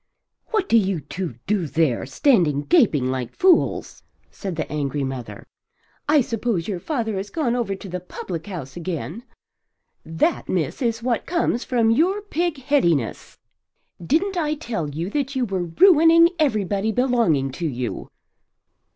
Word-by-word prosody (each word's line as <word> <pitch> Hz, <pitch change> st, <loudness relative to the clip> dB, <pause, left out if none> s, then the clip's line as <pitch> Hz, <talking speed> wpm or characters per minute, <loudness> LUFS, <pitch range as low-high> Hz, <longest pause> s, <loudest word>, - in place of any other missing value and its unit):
"What 430 Hz, -4 st, 0 dB
do 230 Hz, -, +5 dB
you 190 Hz, -4 st, -1 dB
two 155 Hz, 0 st, -5 dB
do 195 Hz, -5 st, 0 dB
there, 150 Hz, -6 st, 0 dB
standing 150 Hz, -, +2 dB
gaping 155 Hz, -, +3 dB
like 130 Hz, -2 st, -4 dB
fools?" 365 Hz, -2 st, +2 dB, 0.3 s
said 190 Hz, -4 st, -5 dB
the 160 Hz, -, -3 dB
angry 145 Hz, -2 st, -2 dB
mother. 130 Hz, -3 st, -6 dB, 0.6 s
"I 300 Hz, -1 st, +5 dB
suppose 230 Hz, -7 st, -2 dB
your 195 Hz, -4 st, -3 dB
father 225 Hz, -, -2 dB
has 195 Hz, +2 st, -4 dB
gone 265 Hz, -7 st, -1 dB
over 230 Hz, -5 st, -1 dB
to 195 Hz, -, -10 dB
the 180 Hz, 0 st, -4 dB
public 175 Hz, -1 st, -7 dB
house 165 Hz, -9 st, -7 dB
again. 175 Hz, +4 st, -5 dB, 0.8 s
That, 165 Hz, -, -1 dB
miss, 170 Hz, -, -1 dB
is 230 Hz, -2 st, -1 dB
what 240 Hz, -2 st, -1 dB
comes 335 Hz, -8 st, 0 dB
from 230 Hz, -3 st, +2 dB
your 370 Hz, -, +2 dB
pigheadedness. 280 Hz, -, 0 dB, 0.7 s
Didn't 355 Hz, -, +1 dB
I 305 Hz, -2 st, 0 dB
tell 225 Hz, -, -4 dB
you 165 Hz, +7 st, -4 dB
that 280 Hz, -1 st, -2 dB
you 255 Hz, -2 st, +1 dB
were 190 Hz, -4 st, -2 dB
ruining 330 Hz, -, +6 dB
everybody 215 Hz, -, +1 dB
belonging 220 Hz, -, +1 dB
to 165 Hz, +5 st, -3 dB
you?" 125 Hz, -4 st, -4 dB
205 Hz, 145 wpm, -22 LUFS, -, 0.8 s, ruining